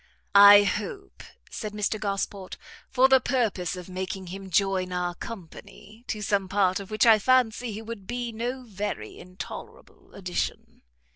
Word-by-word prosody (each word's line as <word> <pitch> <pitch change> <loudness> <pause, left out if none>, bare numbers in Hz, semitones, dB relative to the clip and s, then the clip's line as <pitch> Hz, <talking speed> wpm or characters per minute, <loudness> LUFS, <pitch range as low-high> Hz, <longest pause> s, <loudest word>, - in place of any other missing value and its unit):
"I 205 0 +9
hope," 215 - -4 0.3
said 215 -2 -5
Mr 210 +1 -1
Gosport, 195 -2 -4 0.3
"for 265 0 +4
the 265 0 +6
purpose 215 -9 -1
of 180 -1 -9
making 190 +1 -5
him 195 0 -8
join 185 0 +1
our 180 -1 -2
company, 200 +3 -11
to 210 -1 -4
some 195 -2 0
part 190 -1 +2
of 200 - -9
which 215 +2 +2
I 225 -2 +7
fancy 245 0 +2
he 215 +2 -7
would 220 -4 -8
be 240 0 -3
no 245 +3 -4
very 200 - -5
intolerable 180 +1 -11
addition." 180 -2 -4
205 Hz, 150 wpm, -26 LUFS, 190-225 Hz, 0.3 s, I